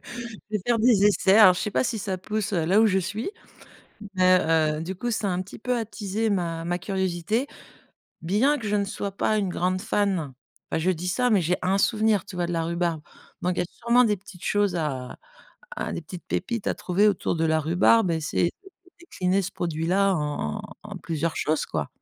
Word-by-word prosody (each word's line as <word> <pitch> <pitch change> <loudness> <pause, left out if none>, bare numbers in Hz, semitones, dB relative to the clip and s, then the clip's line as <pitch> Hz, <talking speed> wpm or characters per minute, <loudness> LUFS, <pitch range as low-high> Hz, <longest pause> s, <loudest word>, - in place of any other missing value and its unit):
Je 235 -3 -7
vais 210 - 0
faire 240 -2 +2
des 220 -4 +4
essais. 200 0 +4
Alors, 190 -4 +9
je - - -4
sais 210 - -2
pas - - +1
si 230 -4 -2
ça 190 -1 -3
pousse, 210 +3 -3
heu, 165 -3 +1
là 195 +6 +4
où 225 - +5
je 190 -1 +2
suis, 205 - -2 0.9
mais 185 0 +5 0.4
heu, - - -4
du 185 +3 -5
coup, 240 +5 -3
ça 210 -2 -1
a - - 0
un 180 +1 -1
petit 185 - -12
peu 250 +1 0
attisé 220 -1 -2
ma 170 -4 -1
ma 175 +1 -1
curiosité. 190 +5 -1 0.8
Bien 225 - +2
que 220 - -6
je 205 - 0
ne 200 - +1
sois 200 0 -4
pas 215 +2 0
une 195 -3 0
grande 185 +1 -1
fan. 190 -9 0 0.4
Ah - - +1
je 180 +3 +2
dis 180 0 -3
ça, 245 +7 +1
mais 210 -4 +4
j'ai 175 +2 +1
un 190 +2 +1
souvenir, 215 0 +2
tu 200 -2 -11
vois 175 -1 -1
de 175 - -4
la 165 -1 0
rhubarbe? 170 -1 -1 0.4
Donc 180 +1 0
il - - -3
y - - +2
a - - -2
sûrement 240 +1 +3
des 210 -3 +2
petites 180 -1 -14
choses 205 -3 +1
à 135 -7 -3 0.6
à - - -3
des - - -4
petites 175 +3 -10
pépites 225 +3 -3
à - - +1
trouver 195 +4 +1
autour 190 -3 -1
de 165 - 0
la 160 0 +2
rhubarbe, 180 +6 +3
et 160 -1 0
c'est 170 +2 0 0.5
décliné 190 - -1
ce 190 +1 -5
produit-là 175 +4 +1
en 150 - -2
en - - -8 0.2
en - - -8
plusieurs 165 0 -3
choses, 155 0 0
quoi. - - -3
190 Hz, 225 wpm, -25 LUFS, 170-210 Hz, 0.9 s, Alors